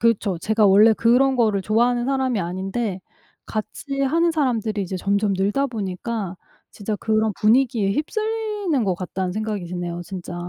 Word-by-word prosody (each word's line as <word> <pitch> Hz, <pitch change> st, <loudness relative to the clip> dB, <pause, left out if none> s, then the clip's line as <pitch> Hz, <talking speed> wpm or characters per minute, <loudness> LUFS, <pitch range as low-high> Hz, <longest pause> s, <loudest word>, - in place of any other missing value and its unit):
그렇죠. 220 Hz, -5 st, +1 dB
제가 215 Hz, +3 st, +2 dB
원래 205 Hz, +3 st, +7 dB
그런 255 Hz, +4 st, +3 dB
거를 215 Hz, -5 st, +2 dB
좋아하는 240 Hz, +4 st, +1 dB
사람이 265 Hz, -5 st, 0 dB
아닌데 190 Hz, +3 st, -3 dB, 0.5 s
같이 275 Hz, +6 st, -4 dB
하는 335 Hz, +5 st, +2 dB
사람들이 230 Hz, -9 st, 0 dB
이제 190 Hz, 0 st, -4 dB
점점 200 Hz, +2 st, 0 dB
늘다 205 Hz, +9 st, +1 dB
보니까 205 Hz, -3 st, -4 dB, 0.4 s
진짜 210 Hz, 0 st, -4 dB
그런 220 Hz, 0 st, +1 dB
분위기에 225 Hz, -2 st, +3 dB
휩쓸리는 420 Hz, -, -1 dB
것 190 Hz, -3 st, +1 dB
같다는 185 Hz, 0 st, -4 dB
생각이 210 Hz, -2 st, -3 dB
드네요 175 Hz, -1 st, -4 dB
진짜. 180 Hz, -1 st, -7 dB
215 Hz, 355 characters per minute, -22 LUFS, 195-255 Hz, 0.5 s, 원래